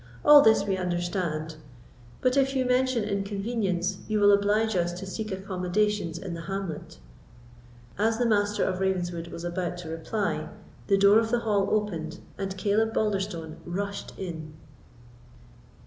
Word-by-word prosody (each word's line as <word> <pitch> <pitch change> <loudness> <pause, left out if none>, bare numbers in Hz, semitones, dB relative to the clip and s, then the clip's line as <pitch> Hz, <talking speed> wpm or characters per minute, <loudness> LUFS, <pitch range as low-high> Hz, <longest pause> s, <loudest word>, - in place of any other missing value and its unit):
All 295 -1 +10
this 220 -5 +4
we 195 -2 0
understand; 175 -3 -2 0.6
but 255 0 +2
if 270 0 +2
you 260 -1 +1
mention 250 -2 +2
inconvenience, 200 -2 -1
you 215 -1 0
will 205 0 +6
oblige 205 +2 +2
us 175 -1 +1
to 180 +2 -7
seek 215 +3 -5
accommodations 190 -1 -1
in 185 0 -6
the 170 - -6
hamlet." 195 - -5 1.0
As 220 +2 +2
the 245 - +1
Master 210 -2 +2
of 185 -1 -1
Ravenswood 175 -3 -1
was 170 - -8
about 175 0 -3
to 175 -2 -7
reply, 165 +6 -2 0.4
the 195 - +4
door 200 +2 +6
of 225 -1 -1
the 240 0 +1
hall 200 -3 +1
opened, 175 -7 -1 0.2
and 195 -1 -4
Caleb 215 +3 +1
Balderstone 190 -7 -1
rushed 200 +3 -5
in. 160 -5 -6
195 Hz, 145 wpm, -27 LUFS, 175-215 Hz, 1.0 s, All